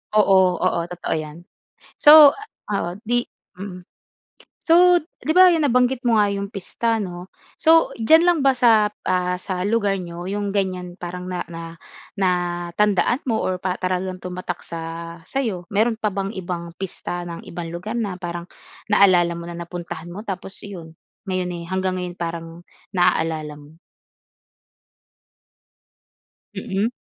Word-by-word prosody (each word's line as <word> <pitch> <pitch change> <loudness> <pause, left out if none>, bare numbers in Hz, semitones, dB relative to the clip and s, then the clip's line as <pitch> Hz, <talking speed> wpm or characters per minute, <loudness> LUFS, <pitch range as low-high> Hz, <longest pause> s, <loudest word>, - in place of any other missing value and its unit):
Oo. 190 -3 +5
Oo, 185 -2 +2
totoo 180 0 -4
'yan. 155 0 -8 0.6
So 295 -1 +9 0.4
oo, 200 -4 -1 0.2
'di 240 0 +1 0.3
mm. 185 -1 -7 0.9
So, 355 +1 +6
'di 315 -1 -4
ba, 365 +1 +8
'yun 325 -3 +2
nabanggit 250 0 +2
mo 235 - +3
nga 205 - +2
'yung 200 0 -4
pista, 225 +3 -1
'no? 180 -2 -6 0.3
So, 325 0 +5
diyan 315 +9 +5
lang 350 -1 +3
ba 270 - +6
sap, 220 -4 +4
ah, 180 0 0
sa 185 -1 -3
lugar 205 -2 +1
n'yo 175 0 -6
'yung 205 0 -2
ganyan 185 -3 -2
parang 180 +1 -6
na 180 -1 -4
na 165 0 -8 0.5
natandaan 180 +5 +1
mo 230 -4 0
or 185 - -1
pa 180 0 -3
para 185 0 +1
lang 185 0 -5
tumatak 180 0 -5
sa 165 -1 -7 0.5
sa'yo. 215 -6 -3
Meron 220 +2 +2
pa 215 -3 -1
bang 195 0 -2
ibang 175 -2 -5
pista 175 -2 -5
ng 170 -1 -7
ibang 170 -1 -6
lugar 215 +7 -4
na 205 -5 -2
parang 175 -1 -5 0.5
naalala 180 -4 +5
mo 170 0 -7
na 170 - -7
napuntahan 175 -1 -7
mo 200 - -7
tapos 195 0 -6
'yun 170 -5 -9 0.4
ngayon, 185 -1 -1
eh, 170 -1 -6
hanggang 185 0 -1
ngayon 180 -1 -4
parang 165 0 -5 0.3
naaalala 160 -4 +1
mo? 150 +2 -16 2.8
Mm. 195 +3 -1
185 Hz, 145 wpm, -22 LUFS, 175-215 Hz, 2.8 s, So